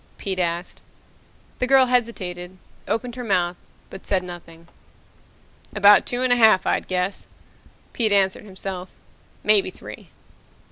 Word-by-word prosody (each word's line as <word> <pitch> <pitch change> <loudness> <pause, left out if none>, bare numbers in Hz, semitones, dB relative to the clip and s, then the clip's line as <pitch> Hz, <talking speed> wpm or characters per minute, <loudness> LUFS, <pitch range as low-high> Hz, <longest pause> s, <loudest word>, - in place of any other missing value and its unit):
Pete 190 -2 -4
asked. 175 0 -3 0.8
The 250 - 0
girl 265 0 +6
hesitated, 185 -8 -2 0.3
opened 235 +3 -3
her 250 - -5
mouth, 180 -5 0 0.4
but 195 - -11
said 190 -2 0
nothing. 170 -2 -11 1.1
"About 205 0 +6
two 245 +1 -2
and 255 -1 +3
a - - +2
half, 220 -5 +5
I'd - - -1
guess," 180 +1 -3 0.7
Pete 225 -3 +1
answered 195 0 +2
himself. 190 -2 -7 0.5
"Maybe 210 -2 +3
three." - - -11
195 Hz, 130 wpm, -22 LUFS, 180-225 Hz, 1.1 s, girl